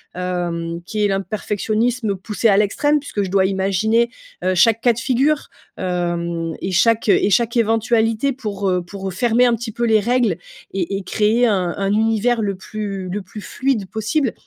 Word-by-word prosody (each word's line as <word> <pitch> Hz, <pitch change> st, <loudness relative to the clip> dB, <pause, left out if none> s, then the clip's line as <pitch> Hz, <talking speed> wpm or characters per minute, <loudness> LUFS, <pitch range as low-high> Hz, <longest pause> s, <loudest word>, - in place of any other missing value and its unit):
hem, 175 Hz, -2 st, -3 dB
qui 210 Hz, +4 st, -2 dB
est -, -, +4 dB
l 205 Hz, -, +1 dB
un 195 Hz, 0 st, 0 dB
perfectionnisme 215 Hz, +3 st, -1 dB
poussé 210 Hz, +4 st, -1 dB
à 195 Hz, -, +4 dB
l'extrême, 290 Hz, +9 st, +2 dB
puisque 275 Hz, -7 st, -4 dB
je 195 Hz, -, -2 dB
dois 190 Hz, 0 st, +3 dB
imaginer, 200 Hz, +5 st, +1 dB, 0.3 s
heu, 185 Hz, 0 st, +1 dB
chaque 225 Hz, +5 st, +4 dB
cas 240 Hz, -1 st, +4 dB
de -, -, -12 dB
figure, 275 Hz, +5 st, +1 dB, 0.3 s
hem, 170 Hz, -2 st, -2 dB
et 190 Hz, -, -3 dB
chaque 225 Hz, +5 st, +3 dB
et 205 Hz, -, +4 dB
chaque 235 Hz, +4 st, +2 dB
éventualité 225 Hz, +2 st, +2 dB
pour, 205 Hz, -6 st, -4 dB
heu, 180 Hz, -1 st, +1 dB
pour 190 Hz, +1 st, -6 dB
fermer 240 Hz, +5 st, +3 dB
un 240 Hz, -, +3 dB
petit 230 Hz, 0 st, -4 dB
peu 235 Hz, -, -4 dB
les 220 Hz, -2 st, +4 dB
règles 235 Hz, -4 st, +1 dB, 0.3 s
et 195 Hz, +1 st, -2 dB
et 195 Hz, -, -6 dB
créer 215 Hz, +5 st, +2 dB
un 185 Hz, -6 st, +1 dB
un 195 Hz, 0 st, 0 dB
univers 225 Hz, +2 st, +2 dB
le 200 Hz, -2 st, -1 dB
plus 195 Hz, -1 st, -5 dB
le 205 Hz, +3 st, -3 dB
plus 200 Hz, +3 st, -10 dB
fluide 245 Hz, -4 st, -1 dB
possible. 220 Hz, +4 st, 0 dB
210 Hz, 185 wpm, -20 LUFS, 190-230 Hz, 0.3 s, est